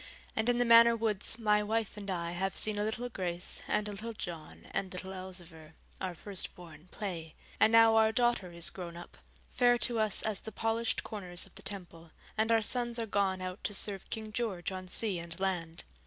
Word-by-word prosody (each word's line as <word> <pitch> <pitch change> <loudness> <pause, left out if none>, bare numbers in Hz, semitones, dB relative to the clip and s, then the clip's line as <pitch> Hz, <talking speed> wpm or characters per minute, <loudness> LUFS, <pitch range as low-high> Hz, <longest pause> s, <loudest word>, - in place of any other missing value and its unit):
And 220 +2 +1
in 245 - +3
the 245 - +3
Manor 235 0 +8
woods 220 -1 0
my 210 -2 +3
wife 220 0 -1
and 200 -1 -7
I 170 -2 -2
have 190 +2 -2
seen 215 -1 0
a - - +1
little 220 +3 -2
Grace 180 -6 -3
and 210 0 +1
a - - -4
little 220 +3 -6
John 170 -7 -7
and 190 -2 -1
little 190 +1 -6
Elzevir, 175 -4 -9 0.3
our 185 -2 -3
firstborn, 175 -4 -5
play; 175 -7 -5 0.3
and 220 - +6
now 225 0 +7
our 220 0 +5
daughter 240 -6 +1
is 170 -1 +1
grown 170 -2 -7
up, 175 - -10 0.4
fair 245 -1 +4
to 235 -1 +2
us 215 -2 +2
as 215 -2 +1
the 220 - -7
polished 225 +2 -1
corners 185 -5 -5
of - - -19
the - - -11
Temple, 175 -4 -8 0.3
and 220 +1 +1
our 225 -1 +4
sons 240 +1 +1
are 230 - -1
gone 195 -3 0
out 185 +2 -6
to 205 - 0
serve 195 -1 +1
King 220 -1 -4
George 210 -6 -2
on 185 -1 -6
sea 195 -1 +2
and 170 +1 -7
land. 175 -3 -2
200 Hz, 205 wpm, -32 LUFS, 180-225 Hz, 0.4 s, Manor